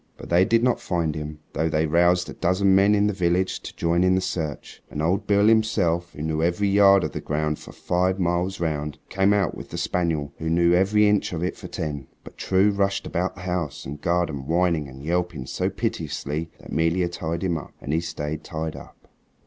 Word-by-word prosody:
But - - -10
they 90 +2 +5
did 115 +2 +2
not 125 -1 +2
find 85 -4 -1
him, 75 0 -6
though 80 +1 0
they 80 0 +1
roused 85 +3 +3
a - - -7
dozen 95 +2 +2
men 100 +2 +5
in 100 0 +3
the 105 - +1
village 90 0 0
to - - -9
join 85 +1 +1
in 95 0 +4
the - - +3
search, 80 -5 -4
and - - -6
old 95 +6 0
Beale 100 0 +4
himself, 105 -6 +2
who 75 - -6
knew 80 0 -1
every 90 +4 +1
yard 100 -1 +6
of - - -2
the - - -5
ground 75 0 -1
for - - -11
five 90 +2 0
miles 90 +2 0
round, 75 -3 -2
came 95 +1 +2
out 100 -4 +2
with - - -9
the - - -6
spaniel 80 -5 -1
who 80 - -2
knew 85 +1 +3
every 100 +4 +4
inch 105 -2 +1
of 85 0 -3
it 90 - -1
for - - -9
ten. 75 -4 -5 0.2
But - - -12
True 95 +2 +2
rushed 100 -1 0
about 95 +2 -2
the 90 - -11
house 90 -6 -3
and 75 +2 -7
garden 85 -6 -1
whining 85 -2 +1
and 65 +1 -11
yelping 85 -4 -1
so - - -1
piteously 75 +3 -3
that - - -13
'Melia 85 +2 +1
tied 85 0 -4
him 85 -4 0
up, - - -12
and 70 +1 -4
he 80 - +2
stayed 80 -2 -4
tied 80 -1 -4
up. - - -13
85 Hz, 220 wpm, -24 LUFS, 80-95 Hz, 0.2 s, yard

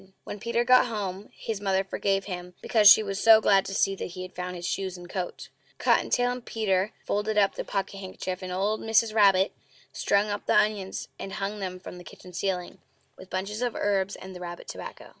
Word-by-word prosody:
When 205 - -7
Peter 235 +2 0
got 250 +1 +5
home 205 -3 -4
his 215 -3 -5
mother 195 -1 +1
forgave 195 0 -1
him, 180 -2 -7
because 215 -3 +6
she 220 - +8
was 195 -1 -3
so 225 -1 +8
glad 195 -3 +4
to 195 - -5
see 195 - +2
that - - -4
he 185 - -4
had 185 - -9
found 180 0 -5
his 175 0 -6
shoes 190 -2 -3
and 175 0 -11
coat. 180 0 -5 0.3
Cotton - - +2
tail 245 0 +2
and 250 -1 -5
Peter 200 -4 0
folded 210 +1 -1
up 200 -2 +4
the - - -4
pocket 195 0 -3
handkerchief, 185 -1 -5
and 185 -1 -5
old 200 +4 0
Mrs. 225 0 +2
Rabbit 195 -3 +5 0.4
strung 205 +1 +1
up 205 - -5
the - - +3
onions 205 -3 0
and 195 - -6
hung 200 +2 -3
them 185 -2 -5
from 180 -1 -10
the - - -11
kitchen 180 +1 -13
ceiling, 180 -1 -3 0.4
with 185 - -13
the - - -5
bunches 210 +4 -4
of 245 -2 -1
herbs 200 -1 0
and 190 0 -10
the - - -8
rabbit 175 -1 -8
tobacco. - - -8
195 Hz, 220 wpm, -27 LUFS, 185-210 Hz, 0.4 s, she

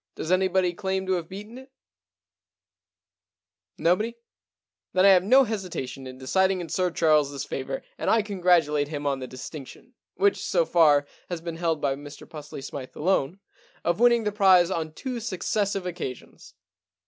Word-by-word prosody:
Does 160 - -4
anybody 185 -1 +2
claim 190 +1 -2
to 190 - -2
have 170 -3 -3
beaten 210 +6 -9
it? 265 +1 -16 2.1
No 170 +2 +3
body? 230 +4 -4 0.8
Then 185 +1 +4
I - - +8
have 185 -2 +6
no 260 +7 +6
hesitation 180 - -5
in 130 0 -9
deciding 190 +8 +1
in 170 -2 -6
Sir 180 +3 0
Charleses 150 -4 +1
favour, - - -5 0.2
and - - -1
I 225 -1 +3
congratulate 175 -7 +2
him 145 -1 -5
on 140 -1 0
the 130 - -6
distinction 130 +2 -10
— - - -67
which, 405 0 +2
so - - +1
far, 150 - +4 0.2
has 175 -2 -3
been 165 0 -6
held 165 -3 -1
by 135 -1 +1
Mr 145 +1 -11
Pusely 150 -3 -9
Smythe 135 -1 -8
alone 180 +1 0 0.2
— - - -31
of 175 +4 +1
winning 235 -1 +5
the 210 - 0
prize 190 -3 +5
on 160 -3 -2
two 250 +8 -5
successive 200 -2 -2
occasions. 170 -8 -7
180 Hz, 170 wpm, -26 LUFS, 150-195 Hz, 2.1 s, I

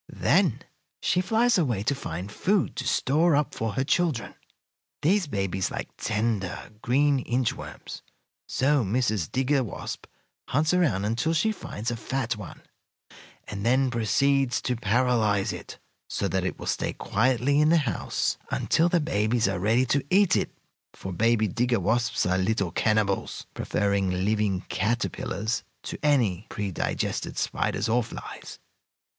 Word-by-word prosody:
"Then - - +2 0.4
she 180 - +1
flies 225 +3 +3
away 120 - 0
to 130 - +1
find 95 -7 -5
food 195 - +1
to 125 - -3
store 155 +6 +3
up 145 0 0
for 110 -2 -2
her 130 - 0
children. 155 -4 0 0.7
These 185 +2 +3
babies 95 -6 -1
like - - -5
tender, 105 -3 -2
green 140 +3 +3
inch 125 -1 0
worms, - - -9 0.5
so 140 0 +2
Mrs. 110 -4 0
Digger 135 +1 +2
Wasp 105 - -6 0.4
hunts 150 +5 +1
around 145 - +2
until 120 +10 0
she 220 +7 +2
finds 115 - -5
a - - -2
fat 120 0 -2
one, 105 -5 -10 0.8
and 100 -1 -5
then 130 +3 +3
proceeds 130 +3 +2
to 125 - 0
paralyze 110 -2 +1
it, - - -9 0.3
so - - -1
that - - -1
it - - -2
will - - -8
stay - - -1
quietly 130 +5 +1
in 155 - +4
the 170 - +5
house 115 - -1
until 165 +2 +2
the 175 - +3
babies 110 -7 +1
are 95 -2 -1
ready 115 +7 +3
to 140 +2 +1
eat 195 0 +4
it, - - 0 0.4
for 95 - -6
baby 110 +3 +2
digger 120 0 +1
wasps 115 +6 +1
are 90 +1 +1
little 100 -2 0
cannibals, 105 0 0
preferring 100 -2 0 0.2
living 105 -3 +1
caterpillars 110 +1 -2 0.2
to - - -6
any 115 - +2
pre 100 -2 -3
digested - - -2
spiders 100 +3 -1
or 120 +2 +3
flies. 115 - -8
120 Hz, 150 wpm, -26 LUFS, 105-140 Hz, 0.8 s, the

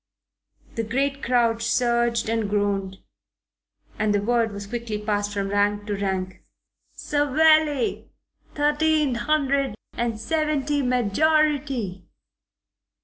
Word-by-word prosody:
The 230 - -2
great 275 +5 -1
crowd 235 -2 +1
surged 235 0 +1
and 225 -2 -1
groaned, 200 -2 -1 1.0
and 215 -1 +1
the 205 - +1
word 230 0 +1
was 200 0 -7
quickly 230 0 -4
passed 205 -1 -2
from 200 -1 -2
rank 205 +1 +1
to 205 -1 -2
rank. 190 -2 -3 0.5
"Savelli. 295 -1 +2 0.5
Thirteen 300 -1 +2
hundred 275 0 0 0.2
and 230 -2 -2
seventy 295 +2 0
majority." 255 - +1
235 Hz, 100 wpm, -24 LUFS, 205-285 Hz, 1.0 s, Savelli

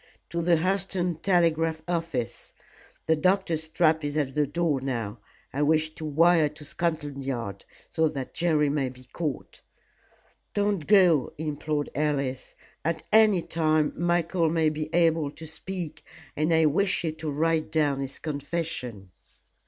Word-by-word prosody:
"To 170 +1 -1
the 170 0 +4
Hurseton 180 -1 -1
telegraph 165 -3 +2
office. 165 - -3 0.5
The 160 - +3
doctor's 165 -2 +1
trap 160 -1 +2
is 145 +1 -2
at 140 -3 0
the 150 0 +1
door 155 -2 0
now. 115 -5 -3 0.3
I 140 - -1
wish 155 +1 +2
to 155 - -7
wire 160 +1 +4
to 150 0 -12
Scotland 150 -4 -2
Yard, 115 -7 -4 0.3
so 160 -2 +2
that 135 -4 -6
Jerry 155 -3 +2
may 140 -2 0
be 125 0 -14
caught." 145 +3 -5 0.9
"Don't 200 -6 0
go," 180 -9 +5
implored 150 -1 -2
Alice, 140 -3 -2 0.3
"at 160 0 -1
any 215 -5 +6
time 155 -2 +1
Michael 170 0 +1
may 160 -1 +2
be 155 0 -4
able 165 -3 +3
to 160 +3 -11
speak, 170 +1 -6 0.3
and 155 +3 +1
I 160 -1 +4
wish 190 +6 +2
you 160 - 0
to 155 0 -5
write 160 +2 0
down 145 -4 +1
his 135 0 -5
confession." 145 - -4
155 Hz, 145 wpm, -27 LUFS, 145-170 Hz, 0.9 s, any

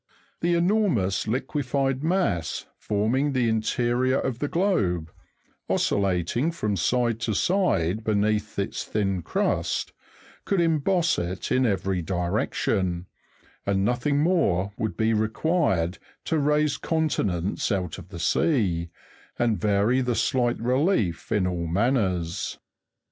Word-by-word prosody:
The 175 +1 +1
enormous 170 - +1
liquified 135 +2 -1
mass 165 - 0
forming 120 +8 0
the 125 -3 +2
interior 120 +3 +1
of 125 -3 -2
the 145 - -1
globe, 95 - 0 0.6
oscillating 100 - +1
from 105 -11 -2
side 115 +4 +1
to 115 -3 -1
side 110 - +1
beneath 105 0 0
its 100 - -2
thin 95 -4 -1
crust, 80 - -1 0.5
could 195 - 0
emboss 165 +1 +2
it 90 +2 -4
in 130 -1 +3
every 95 -2 0
direction, 90 0 -1 0.6
and 100 -1 +1
nothing 125 +5 +1
more 100 - +2
would 110 0 -3
be 110 0 +2
required 110 - 0 0.3
to 160 - +1
raise 150 0 +2
continents 105 - -1
out 90 -5 -2
of 90 -1 -12
the 90 - -8
sea, 85 - +1 0.5
and 115 -6 +1
vary 105 +5 +2
the 125 -2 0
slight 120 -2 +1
relief 120 - 0
in 105 -4 +2
all 85 -2 -2
manners. 95 -3 0
110 Hz, 120 wpm, -25 LUFS, 95-140 Hz, 0.6 s, in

